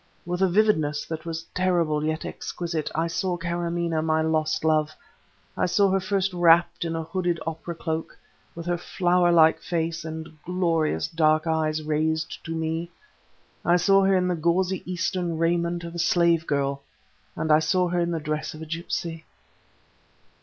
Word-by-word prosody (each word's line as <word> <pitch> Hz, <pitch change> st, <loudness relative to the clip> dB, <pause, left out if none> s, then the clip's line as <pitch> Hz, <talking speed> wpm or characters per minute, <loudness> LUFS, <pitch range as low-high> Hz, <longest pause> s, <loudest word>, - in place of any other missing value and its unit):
With 180 Hz, +1 st, -3 dB
a 190 Hz, -, +4 dB
vividness 165 Hz, -7 st, +2 dB
that 160 Hz, 0 st, -6 dB
was 165 Hz, 0 st, -4 dB
terrible 170 Hz, -5 st, +1 dB
yet 155 Hz, +1 st, -2 dB
exquisite, 165 Hz, -3 st, -4 dB
I 165 Hz, +1 st, +1 dB
saw 175 Hz, +2 st, -1 dB
Kâramaneh, 170 Hz, -1 st, -1 dB
my 160 Hz, 0 st, +1 dB
lost 155 Hz, 0 st, 0 dB
love; 155 Hz, -1 st, +2 dB, 0.6 s
I -, -, +1 dB
saw 200 Hz, +2 st, +3 dB
her 195 Hz, -, +2 dB
first 190 Hz, 0 st, -1 dB
wrapped 170 Hz, -1 st, +4 dB
in 165 Hz, -1 st, -2 dB
a 165 Hz, -, -2 dB
hooded 175 Hz, 0 st, -1 dB
opera 165 Hz, +1 st, -5 dB
cloak, 160 Hz, 0 st, -4 dB, 0.4 s
with 170 Hz, 0 st, -7 dB
her 175 Hz, -1 st, -1 dB
flower 175 Hz, 0 st, +2 dB
like 160 Hz, -1 st, +5 dB
face 165 Hz, -1 st, -2 dB
and 160 Hz, -1 st, -7 dB
glorious 165 Hz, -, 0 dB
dark 155 Hz, -1 st, +2 dB
eyes 155 Hz, -1 st, 0 dB
raised 160 Hz, +1 st, -1 dB
to 165 Hz, 0 st, -4 dB
me; 160 Hz, +1 st, -2 dB, 0.7 s
I 175 Hz, -, +4 dB
saw 195 Hz, +3 st, +4 dB
her 195 Hz, 0 st, +4 dB
in 180 Hz, 0 st, +1 dB
the 180 Hz, -, +1 dB
gauzy 180 Hz, +3 st, +1 dB
Eastern 175 Hz, -2 st, -1 dB
raiment 170 Hz, +1 st, 0 dB
of 170 Hz, 0 st, -7 dB
a 170 Hz, -, -5 dB
slave 170 Hz, -1 st, +3 dB
girl, 140 Hz, -1 st, -1 dB, 0.5 s
and 160 Hz, -, -1 dB
I 150 Hz, -, +7 dB
saw 180 Hz, +3 st, +1 dB
her 175 Hz, 0 st, 0 dB
in 170 Hz, 0 st, +1 dB
the 165 Hz, -1 st, -1 dB
dress 155 Hz, 0 st, -3 dB
of 155 Hz, -, -8 dB
a -, -, -7 dB
gipsy. 165 Hz, 0 st, -4 dB
165 Hz, 170 wpm, -25 LUFS, 160-175 Hz, 0.7 s, I